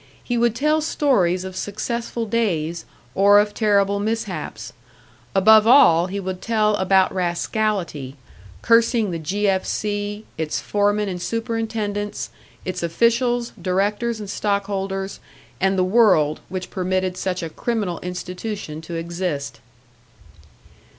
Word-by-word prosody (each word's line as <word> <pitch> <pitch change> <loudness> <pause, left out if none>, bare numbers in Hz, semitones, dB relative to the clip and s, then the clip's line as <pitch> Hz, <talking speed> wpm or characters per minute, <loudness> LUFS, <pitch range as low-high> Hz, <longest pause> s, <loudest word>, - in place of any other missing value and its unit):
He 245 - -2
would 235 -1 +2
tell 305 +5 +2
stories 200 - +1
of 190 -1 -7
successful 230 +4 -3
days, 175 -8 -1 0.3
or 200 +1 +6
of 210 0 +1
terrible 200 -2 +2
mishaps. 220 +2 -4 0.6
Above 215 +3 +6
all 180 -10 +6
he 200 +2 -4
would 185 -1 -5
tell 215 -2 +2
about 190 0 +3
rascality 175 -5 -2 0.5
cursing 230 -2 +3
the 165 - -3
"G. 200 +6 -1
F. 190 -1 +2
C.," 205 0 -3
its 155 -1 -1
foremen 205 0 +1
and 180 -2 -4
superintendents, 225 -2 -3 0.3
its 185 - -3
officials, 235 +7 +1
directors 205 +5 0
and 210 - -6
stock 200 0 -1
holders, 195 -1 -3 0.4
and 190 0 +2
the 185 - +3
world 185 -7 +4
which 185 0 -5
permitted 185 -1 -1
such 185 -1 -3
a 165 - -4
criminal 210 -5 -2
institution 180 -2 -5
to 165 +1 -7
exist. 170 -3 -3
200 Hz, 125 wpm, -22 LUFS, 180-220 Hz, 0.6 s, or